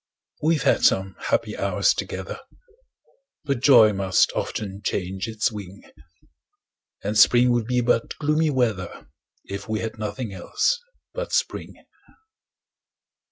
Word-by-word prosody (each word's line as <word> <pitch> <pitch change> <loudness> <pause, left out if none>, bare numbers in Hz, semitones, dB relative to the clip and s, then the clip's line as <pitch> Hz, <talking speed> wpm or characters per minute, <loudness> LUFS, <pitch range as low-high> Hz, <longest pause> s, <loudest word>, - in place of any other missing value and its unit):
We've 160 0 +1
had - - +2
some 95 0 +2
happy - - 0
hours - - +1
together, - - -5 1.0
But 140 -4 -1
joy 120 -5 +6
must 95 -2 +2
often 100 -1 -4
change 95 +1 -3
its 110 +1 -1
wing; 100 -2 -9 1.2
And 105 +2 -2
spring 120 +3 +6
would 120 -2 0
be 125 0 +1
but 115 -1 0
gloomy 155 +1 +1
weather, 115 - -2 0.4
If 100 +1 -7
we 110 0 -1
had 110 -1 -5
nothing 110 0 -4
else 285 - 0 0.3
but - - -5
spring. - - -2
110 Hz, 120 wpm, -23 LUFS, 100-125 Hz, 1.2 s, joy